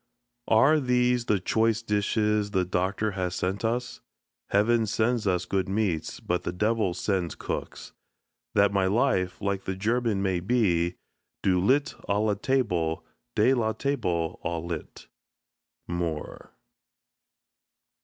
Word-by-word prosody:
Are 135 +8 +5
these 125 -2 +2
the 105 -4 +2
choice 115 +4 +1
dishes 105 0 +1
the 95 -3 +1
Doctor 95 +4 -1
has 90 -2 -2
sent 95 +2 -2
us? 120 +2 -2 0.5
Heaven 110 +2 +3
sends 110 +1 0
us 90 -2 +1
good 95 +1 -1
meats, 95 -6 -1
but 90 0 -1
the 90 - -3
Devil 105 0 0
sends 90 -3 -1
cooks. - - -6 0.6
That 100 -1 +4
my 95 -2 +2
life, 95 -4 +1
like 100 -1 -1
the 95 - -2
German, 110 0 0
may 95 -2 +1
be 90 -5 +1 0.5
"Du 90 -2 +3
lit 140 +7 +2 0.2
a 100 - +2
la 105 0 +2
table, 100 -8 0 0.3
de 115 +5 +4
la 110 -4 +1
table 90 - -1
au 85 - -2
lit." 85 -2 -7 0.8
MOORE. 85 -3 -4
100 Hz, 130 wpm, -27 LUFS, 90-115 Hz, 0.8 s, Are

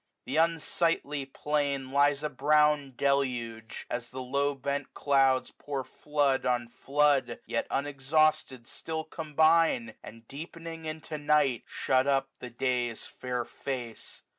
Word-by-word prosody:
The 135 +5 -2
unsightly 165 -3 +1
plain 145 0 -1
7S - - -12
Lies 145 +1 +3
a 150 - 0
brown 150 0 +3
deluge; 120 -5 -1
as 120 -1 -4
the 130 - -7
low 140 +3 0
bent 140 +1 -3
clouds 135 -2 +3
Pour 140 -2 -3
flood 145 -1 0
on 120 -1 0
flood, 140 -2 +1
yet 115 - -2
unexhausted 140 -2 +1
still 160 +5 -4
Combine, 160 -5 +2
and 115 0 -12
deepening 165 +2 -8
into 155 0 -5
night, 145 -5 +2
shut 130 +1 +1
up 135 -1 +2
The 125 - -7
day's 120 -1 -1
fair 125 -1 -4
face. 120 -4 -6
140 Hz, 130 wpm, -29 LUFS, 125-150 Hz, -, Lies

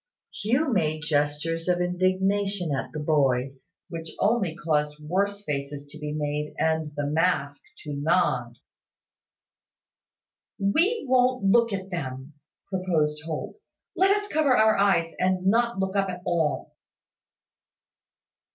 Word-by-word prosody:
Hugh 255 +6 0
made 155 -5 0
gestures 150 +2 -1
of 180 -1 +2
indignation 185 0 0
at 135 - -3
the - - -6
boys, 135 -3 0 0.2
which 165 -2 -6
only 200 -6 +1
caused 150 -3 -1
worse 200 +6 -1
faces 140 0 -4
to 155 - -11
be 150 -1 -4
made, 150 0 -3
and 160 -1 0
the 145 - -2
mask 145 -2 0 0.2
to 150 - -5
nod. 140 -6 +1 2.0
"We 325 - +1
wont 255 -2 +3
look 230 +3 +4
at 195 -1 -4
them," 135 -3 -5 0.3
proposed 160 -6 0
Holt. 160 - -5 0.4
"Let 380 +1 +4
us 410 +1 +2
cover 295 -7 +2
our 220 0 +5
eyes, 180 -5 +2
and 185 0 +1
not 235 +3 +2
look 190 0 -2
up 195 -1 +1
at 180 0 -6
all." 165 -4 -1
175 Hz, 125 wpm, -26 LUFS, 150-200 Hz, 2.0 s, our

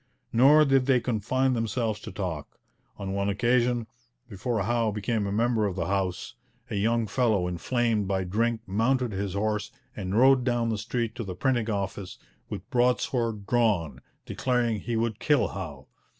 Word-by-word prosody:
Nor 145 +6 +6
did 135 -2 +3
they 130 -2 +4
confine 125 +3 0
themselves 115 -2 -1
to - - -8
talk. 85 -7 -5 0.4
On 95 -1 -4
one 100 0 0
occasion, 120 +3 +1 0.4
before 110 +1 -2
Howe 115 +1 +1
became 105 0 -1
a - - -2
member 110 0 +1
of 95 - -4
the 90 -3 -2
House, 95 +2 -2 0.4
a - - -2
young 115 +3 +1
fellow 105 -4 +1
inflamed 110 +3 0
by 95 -1 0
drink 110 +5 0
mounted 120 +5 +1
his 100 -1 -3
horse 105 0 -1 0.2
and 95 0 -3
rode 130 +1 +6
down 120 -2 0
the 110 -2 -1
street 115 +1 -2
to 115 - -3
the 95 -3 -6
printing 120 +2 0
office, 100 -2 -3 0.3
with - - -6
broadsword 120 -4 +1
drawn, 105 - +1 0.2
declaring 120 -4 0
he 120 +2 -3
would 115 0 -1
kill 145 +1 +2
Howe. - - -7
110 Hz, 165 wpm, -27 LUFS, 100-120 Hz, 0.4 s, Nor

